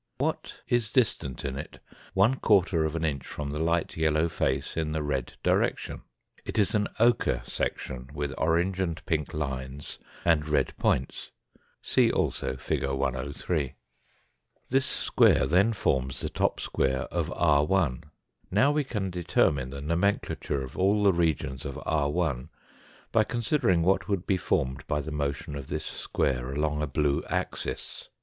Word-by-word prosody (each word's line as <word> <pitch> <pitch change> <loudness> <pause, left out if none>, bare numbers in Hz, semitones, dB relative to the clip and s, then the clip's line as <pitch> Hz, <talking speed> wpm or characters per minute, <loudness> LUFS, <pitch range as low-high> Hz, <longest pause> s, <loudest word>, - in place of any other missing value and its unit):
What - - -2
is 120 -3 +1
distant 85 - 0
in 65 -1 -2
it 75 +3 -7 0.4
one 110 +7 +4
quarter 90 -6 +3
of 80 +1 -2
an 80 0 0
inch 70 -4 -1
from 70 -1 -5
the 75 - -3
light 85 +1 0
yellow 80 0 +2
face 70 -3 -1
in 80 -1 -1
the 80 -1 -1
red 70 -4 -2
direction? - - +1 0.4
It - - -5
is 105 -3 +3
an 105 -2 +2
ochre 115 - +3
section 65 0 -3
with 75 -2 -3
orange 85 +4 +1
and 85 -4 -2
pink 75 -2 -1
lines 70 -2 -4 0.3
and 80 -3 +3
red 70 -3 +1
points; 65 - 0 0.5
see - - +3
also - - -1
fig. - - -2
103. 70 +2 -1 0.9
This 130 +1 +2
square - - +3
then 95 +7 +4
forms 65 - 0
the - - -2
top - - 0
square 65 -1 0
of - - -1
r\. 75 +2 +3 0.6
Now 105 +10 +4
we 150 0 +1
can 105 -8 -3
determine 75 -6 +1
the 70 +1 -7
nomenclature 85 -3 0
of 65 - -9
all 100 +3 +3
the 100 -2 +5
regions 80 -6 0
of 70 - -5
r\ 75 0 +1 0.8
by 110 - +4
considering 115 - +1
what 95 +1 +2
would 100 -3 -1
be 95 - +2
formed 65 -8 -1
by 75 - 0
the 75 +2 -5
motion 70 0 -2
of 70 -2 -6
this - - -3
square 65 -1 -1
along 75 +1 0
a 75 - 0
blue 70 0 +1
axis. - - -3
80 Hz, 155 wpm, -28 LUFS, 70-95 Hz, 0.9 s, the